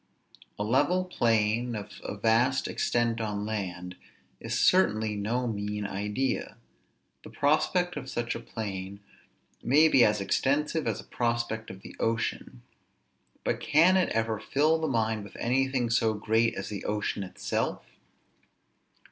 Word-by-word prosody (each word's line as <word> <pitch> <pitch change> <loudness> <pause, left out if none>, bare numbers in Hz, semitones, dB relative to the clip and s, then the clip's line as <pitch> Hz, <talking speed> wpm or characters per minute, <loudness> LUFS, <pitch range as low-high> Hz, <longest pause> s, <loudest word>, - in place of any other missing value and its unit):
A 105 - -2
level 170 - +2
plain 115 -6 +1
of 105 -1 -8
a - - -5
vast 115 +6 +2
extent 120 -1 0
on 105 -2 -3
land, 90 -4 -4 0.4
is - - -2
certainly 110 - +3
no 115 +5 -1
mean 105 -2 -3
idea; 105 +7 -2 0.6
the - - -11
prospect 175 +5 +1
of 135 -3 -6
such 120 0 -2
a - - -5
plain 100 -4 -6 0.6
may 150 +6 +5
be 135 -5 +5
as 105 -1 +3
extensive 145 +9 0
as 110 -2 -1
a - - -8
prospect 115 -2 -2
of 95 - -10
the - - -11
ocean; 115 - -2 0.8
but - - -1
can 165 +5 +4
it 185 -1 +3
ever 115 -1 -1
fill 150 +8 +2
the 160 - -1
mind 110 -4 0
with 100 - -12
anything 130 -1 +1
so 115 -1 +2
great 110 +2 +1
as - - -5
the 100 -3 -5
ocean 105 -1 -2
itself? 95 -1 -3
115 Hz, 140 wpm, -28 LUFS, 105-130 Hz, 0.8 s, may